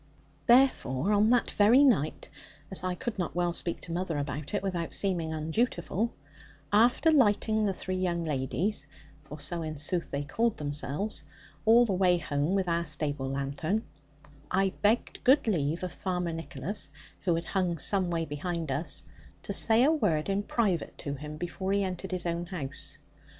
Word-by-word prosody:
Therefore, 210 - +4
on 210 +1 +4
that 245 0 +3
very 230 +7 +6
night, 200 - +2 0.4
as 190 - -2
I 185 -1 -1
could 220 +3 -4
not 175 - -2
well 175 -1 +1
speak 170 0 -2
to - - -7
mother 170 -2 -2
about 145 +4 -3
it, 200 - -1
without 175 -4 -2
seeming 175 -5 0
undutiful, 175 +6 -1 0.6
after 240 +9 +5
lighting 220 -5 +3
the 195 - +1
three 185 0 -4
young 175 -2 0
ladies 150 - -1 0.3
for 150 0 -10
so 170 +4 -4
in 155 -1 -4
sooth 165 +4 -1
they 140 +1 -2
called 225 +10 0
themselves 150 - -2 0.4
all 235 +2 +7
the 205 - -1
way 180 -1 +4
home 150 +2 -1
with 190 -2 +1
our 170 0 +1
stable 150 -3 -2
lanthorn, 140 +10 -1 0.7
I 195 +1 +2
begged 215 +3 +1
good 270 +4 +5
leave 165 -4 0
of 180 - -3
Farmer 180 -2 -2
Nicholas 165 0 -5 0.3
(who 175 -4 +1
had 165 0 -3
hung 180 -3 0
some 185 +3 +2
way 165 -1 -1
behind 160 +1 -3
us) 145 +5 -3 0.4
to - - -3
say 225 +2 +4
a 295 - +5
word 200 - +1
in 195 +1 +1
private 205 -5 -1
to 140 - -4
him, 150 +2 -7
before 185 +4 -3
he 200 0 +2
entered 185 0 -4
his 180 -2 -2
own 170 0 -2
house. 150 -7 -5
175 Hz, 170 wpm, -29 LUFS, 155-205 Hz, 0.7 s, all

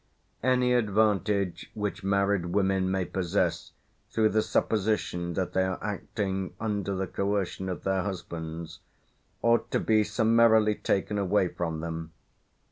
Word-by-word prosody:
Any 125 0 +3
advantage 105 -5 +1
which 105 -1 -3
married 100 -2 +1
women 95 0 +1
may 95 -1 0
possess 90 -3 -1 0.4
through 110 -1 +2
the 110 +1 +2
supposition 100 -6 0
that 95 -2 -2
they 95 - +2
are 95 -1 -1
acting 95 -2 -3
under 105 -3 -2
the 95 +1 -1
coercion 100 0 -2
of 90 - -5
their 95 -1 +1
husbands 85 -4 -6 0.6
ought 115 0 +3
to - - +1
be 110 -1 +3
summarily 110 0 +4
taken 100 0 -1
away 95 -1 +2
from 80 -3 -3
them. 80 0 -5
100 Hz, 130 wpm, -28 LUFS, 90-105 Hz, 0.6 s, summarily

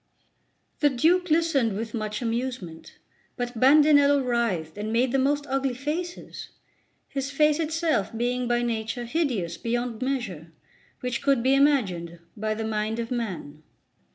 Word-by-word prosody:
The 295 - +4
Duke 340 +8 +2
listened 305 -8 +2
with 225 0 -5
much 215 0 -3
amusement; 230 -8 -4 0.4
but 245 -2 -4
Bandinello 285 +1 +6
writhed 225 -10 -1
and 210 +1 -4
made 240 +2 +2
the 270 - +2
most 285 +2 +1
ugly 270 -1 -1
faces 320 +7 -5 0.6
his 275 0 -3
face 300 +2 +3
itself 315 - 0
being 245 +1 -1
by 240 0 +1
nature 230 +1 -2
hideous 235 - -1
beyond 240 0 -2
measure 225 - -3 0.5
which 250 -1 -2
could 275 -4 +2
be 260 +1 +4
imagined 205 - +2 0.2
by 215 0 -2
the 220 0 -3
mind 215 0 -1
of 230 0 -4
man. 185 -11 -4
245 Hz, 140 wpm, -26 LUFS, 220-280 Hz, 0.6 s, Bandinello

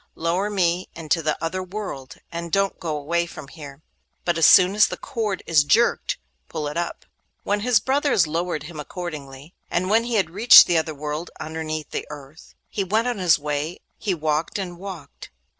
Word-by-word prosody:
Lower 175 +5 -1
me 180 -3 0
into 165 0 -1
the 155 -1 -1
other 185 +3 -2
world, 185 -9 -7 0.2
and 170 0 -5
don't 195 +1 +1
go 155 -3 -3
away 170 +4 -1
from 140 -4 -10
here, 145 -2 -11 0.4
but 175 - +1
as 165 - +5
soon 185 0 +7
as 210 0 +5
the - - -6
cord 210 -5 -3
is 155 -3 +4
jerked, 230 +11 +2 0.3
pull 150 -1 -3
it 145 - -5
up.' 170 0 -4 0.4
His 210 +3 +2
brothers 270 - +2
lowered 165 0 -2
him 155 0 -9
accordingly, 150 -3 -7 0.2
and 185 +3 -1
when 225 +2 +3
he 240 -1 -2
had 190 -6 +1
reached 225 +7 +9
the 170 -2 +2
other 160 -1 -4
world, 150 +3 -4
underneath 155 -1 -5
the - - -4
earth, 150 +1 -12
he 200 - -2
went 215 +5 0
on 245 -4 -2
his 175 -4 +4
way. 150 +3 -3 0.2
He 195 -4 -1
walked 155 +4 -1
and 175 -3 -5
walked. 180 -7 -9
170 Hz, 185 wpm, -23 LUFS, 155-195 Hz, 0.4 s, reached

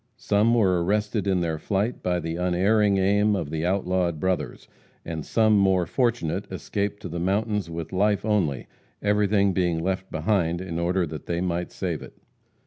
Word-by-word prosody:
Some 110 0 +2
were 95 -6 +3
arrested 105 +2 0
in 95 -2 +2
their 80 -2 -2
flight 105 +7 -1
by 90 -1 0
the 80 -1 -4
unerring 95 +4 +2
aim 105 +2 +3
of 80 -6 -3
the 80 0 -2
outlawed 90 -3 0
brothers; 90 -7 -2 0.4
and 80 -2 -4
some 110 +3 +3
more 95 -3 +3
fortunate 100 - -1
escaped 100 +2 -3
to - - -4
the 85 0 -5
mountains 100 +1 0
with 85 0 -6
life 105 +2 +1
only, 90 - 0 0.4
everything 105 -1 +2
being 90 -2 +1
left 95 +3 -2
behind 85 -5 0
in 85 -2 -4
order 90 +1 +1
that 75 -2 -8
they 85 0 -1
might 90 -1 -2
save 85 -5 -3
it. - - -11
95 Hz, 170 wpm, -25 LUFS, 85-105 Hz, 0.4 s, were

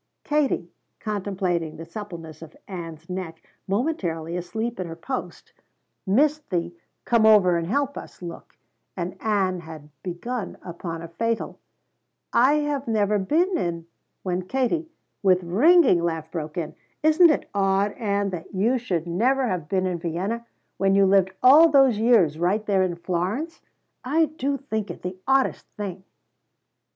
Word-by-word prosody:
Katie, 280 - 0 0.3
contemplating 185 -6 -2
the 165 - -8
suppleness 165 -4 -8
of 160 -1 -12
Ann's 165 -4 -7
neck, 180 -3 -5 0.3
momentarily 185 - -1
asleep 220 +6 -3
at 185 - -3
her 165 - -7
post, 255 +10 -6 0.5
missed 295 +9 +2
the 175 -2 -1 0.3
"Come 235 -2 +3
over 205 -5 +6
and 165 -1 -1
help 280 +6 0
us" - - -13
look, 175 -2 -9 0.4
and 180 0 -3
Ann 195 -4 +1
had 160 -3 -11
begun 195 - -5
upon 170 -1 -6
a - - -6
fatal, 230 +7 -2 0.7
"I 260 +4 +5
have 290 -3 -1
never 210 -2 +2
been 335 - +1
in 170 - -2 0.2
" - - -51
when 180 -1 -2
Katie, 270 - 0 0.3
with 185 -2 +3
ringing 225 - +5
laugh 160 -2 -2
broke 155 -2 -5
in: 160 -3 -3 0.3
"Isn't 315 +3 +6
it 305 - 0
odd, 195 0 +2
Ann, 200 -3 -1
that 180 +2 -7
you 230 +7 +2
should 180 -9 -2
never 250 +10 +1
have 175 -7 -3
been 190 -1 +1
in 180 -2 -2
Vienna, 190 +8 -3 0.3
when 195 0 +2
you 200 0 +5
lived 190 -1 +4
all 300 +6 +8
those 270 -7 +5
years 205 -10 +4
right 195 +5 +1
there 195 -2 +2
in 185 -2 0
Florence? 185 - -3 0.4
I 315 +6 +3
do 280 -2 -2
think 220 -7 -4
it - - -8
the 180 +1 -5
oddest 270 0 +2
thing!" 190 -2 -5
195 Hz, 155 wpm, -24 LUFS, 170-245 Hz, 0.7 s, all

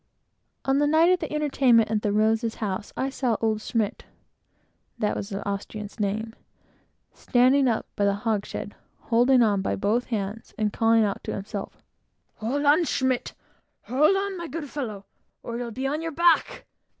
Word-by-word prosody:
On 270 +1 +2
the 290 - +3
night 320 +4 +5
of 365 - +3
the - - -5
entertainment 265 -7 +3
at 215 -1 +1
the 210 - 0
Rosa's 220 +2 +1
house, 205 -1 -4
I 270 +1 -1
saw 250 -4 0
old 220 -1 0
Schmidt, 215 -2 -2 0.9
(that 210 - 0
was 200 - -4
the 200 -1 -5
Austrian's 205 +2 -5
name) 215 +2 -2 0.8
standing 260 +2 +3
up 230 -3 0
by 205 - +1
a 200 - +3
hogshead, 205 -1 -3 0.3
holding 245 +2 +4
on 205 -3 +2
by - - -1
both 215 +5 0
hands, 215 -1 -4
and 210 -1 0
calling 225 0 +4
out 200 -2 -2
to - - -3
himself 200 0 -7 0.5
"Hold 265 +7 -2
on, 300 +4 +5
Schmidt! 260 -4 -1 0.5
hold 295 +9 +3
on, 395 0 -2
my 340 - -5
good 295 -1 -6
fellow, 215 -9 -5 0.4
or 235 0 -5
you'll 240 -1 -4
be 260 +4 -5
on 295 +3 -1
your 330 0 -3
back!" 340 +1 +2
230 Hz, 170 wpm, -25 LUFS, 210-270 Hz, 0.9 s, night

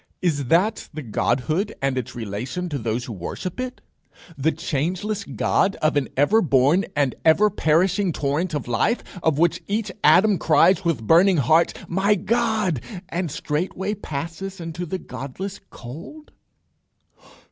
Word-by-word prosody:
Is 150 -7 0
that 185 - +1
the 155 -2 -6
Godhood, 135 - -1
and 135 -1 0
its 130 -3 -4
relation 120 - -4
to 145 -3 -3
those 115 +1 -2
who 120 - -6
worship 110 - -6
it? 255 0 -5 0.5
The 150 +4 +1
changeless 185 +10 -2
God 195 +1 +1
of 155 0 0
an 145 -2 0
ever 195 +11 +4
born 145 +3 +3
and 140 -3 +1
ever 200 +7 +5
perishing 185 +3 +2
torrent 155 +3 -1
of 145 - -4
life; 120 - +1 0.2
of 160 -4 +1
which 170 +1 +2
each 210 0 -1
atom 190 +6 +5
cries 190 0 +4
with 155 -11 -1
burning 175 - +5
heart, 155 +5 +3
My 195 +4 +2
God! 215 - 0 0.3
and 175 -1 -2
straightway 180 +8 -2
passes 180 +2 -6
into 170 +1 -5
the 190 - -2
Godless 160 +7 -7
cold! 165 - -10
165 Hz, 145 wpm, -23 LUFS, 140-195 Hz, 0.5 s, ever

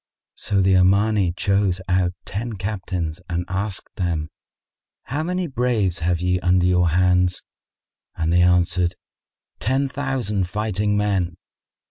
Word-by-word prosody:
So 100 -2 0
the 95 0 +4
Omani 100 +1 +3
chose 100 0 +1
out 90 -1 +1
ten 115 +5 -4
captains 90 -4 -4
and 85 0 -2
asked 95 +1 -4
them, 85 -4 -1 0.7
"How 145 +5 -3
many 180 +2 -1
braves 120 - 0
have 85 0 0
ye 90 0 +1
under 90 0 +2
your 90 -1 +3
hands?"; 90 +1 +2 0.7
and 80 0 0
they 90 - +5
answered, 90 0 +2 0.6
"Ten 135 +4 +1
thousand 125 -9 -2
fighting 105 0 0
men." 95 -4 0
95 Hz, 125 wpm, -22 LUFS, 90-105 Hz, 0.7 s, they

